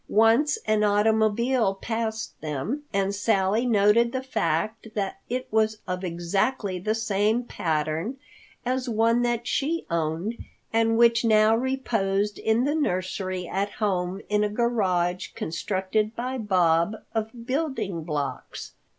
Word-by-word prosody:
Once 230 - +4
an 215 -1 +2
automobile 220 +1 +2
passed 225 +1 -3
them 155 - -3
and 195 0 0
Sally 205 +2 +1
noted 220 +1 +4
the 260 0 -3
fact 215 -1 -1
that 195 -2 -2
it 255 +1 -2
was 220 0 +2
of 180 0 -3
exactly 185 +4 -1
the 215 +5 -1
same 220 +1 +1
pattern 160 - -2 0.5
as 255 0 -1
one 230 +1 +3
that 240 -1 0
she 320 +7 -1
owned 170 +7 -2 0.3
and 225 0 +3
which 235 0 +5
now 215 -1 +5
reposed 220 -6 0
in 220 +2 +2
the 285 +2 +1
nursery 185 - -2
at 200 +3 -2
home 190 -3 -1
in 210 0 +2
a 210 - +1
garage 190 -6 0
constructed 195 +6 -1
by 250 +2 -3
Bob 180 -2 +2 0.2
of 225 +1 -4
building 250 - -2
blocks. 145 -5 -4
215 Hz, 130 wpm, -25 LUFS, 185-235 Hz, 0.5 s, which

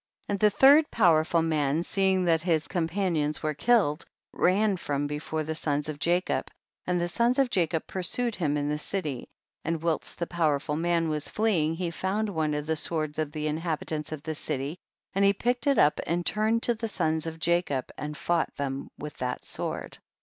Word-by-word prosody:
61. - - 0
And 200 - -1
the 210 - +5
third 290 +3 +7
powerful 170 -4 +3
man, 155 -1 +1
seeing 190 0 +2
that 165 -2 +3
his 160 -3 +1
companions 165 -3 -1
were 155 0 0
killed, 155 -3 +2 0.3
ran 200 +3 +2
from 145 -4 -2
before 150 +2 -3
the 160 +1 -3
sons 150 -2 -1
of 150 -2 -5
Jacob, 175 +3 0 0.4
and 180 0 +1
the 175 - 0
sons 235 +8 +1
of 270 -3 +2
Jacob 170 -5 0
pursued 230 +6 -1
him 150 -7 0
in 145 0 -1
the 150 0 -1
city; 150 -7 -4 0.3
and 165 0 -2
whilst 165 -2 -1
the 170 - -2
powerful 150 -4 0
man 170 +1 +1
was 150 -1 -1
fleeing 175 -8 +1
he 175 0 -2
found 200 +5 -1
one 155 -5 -1
of 150 0 -3
the 160 +1 0
swords 155 -1 -1
of 155 -2 -1
the 155 0 -4
inhabitants 155 -1 -2
of 155 -2 -6
the 160 - -3
city, 150 +2 -3 0.3
and 195 +1 +2
he 200 0 +5
picked 245 +5 -1
it 280 - +4
up 150 - +4
and 175 +1 -1
turned 220 +2 +1
to 240 - +3
the 230 0 -4
sons 160 -6 -1
of 160 0 -5
Jacob 165 -6 0
and 150 +1 -5
fought 170 +3 0
them 140 -1 -4
with 150 0 -7
that 125 0 -3
sword. - - -2
165 Hz, 195 wpm, -27 LUFS, 150-190 Hz, 0.4 s, third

